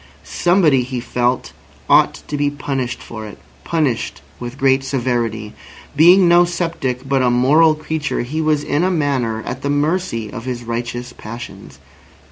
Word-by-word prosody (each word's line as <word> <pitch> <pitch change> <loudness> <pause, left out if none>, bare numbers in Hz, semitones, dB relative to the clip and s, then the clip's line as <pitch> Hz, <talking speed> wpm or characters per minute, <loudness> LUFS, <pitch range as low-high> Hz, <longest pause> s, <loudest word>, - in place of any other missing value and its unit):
Somebody, 175 -7 +3
he 125 0 -4
felt, 125 +1 -1 0.3
ought - - +3
to 150 - -3
be 145 0 +1
punished 135 -3 -4
for 110 -2 -8
it—punished 115 - -3 0.2
with 120 +2 -7
great 135 0 +3
severity. 120 -5 -2 0.4
Being 175 +5 +7
no 175 +1 +6
sceptic, 165 -7 -3
but 135 -1 +2
a 125 - +3
moral 150 +6 +4
creature, 155 -1 -3
he 150 +6 -3
was 155 -2 +1
in 145 +4 0
a 185 - +2
manner 135 -10 -1
at 130 +1 -5
the 140 - -2
mercy 145 - -1
of 115 -1 -7
his 125 -2 -4
righteous 120 +1 -4
passions. 115 +3 -9
135 Hz, 150 wpm, -18 LUFS, 120-155 Hz, 0.4 s, Being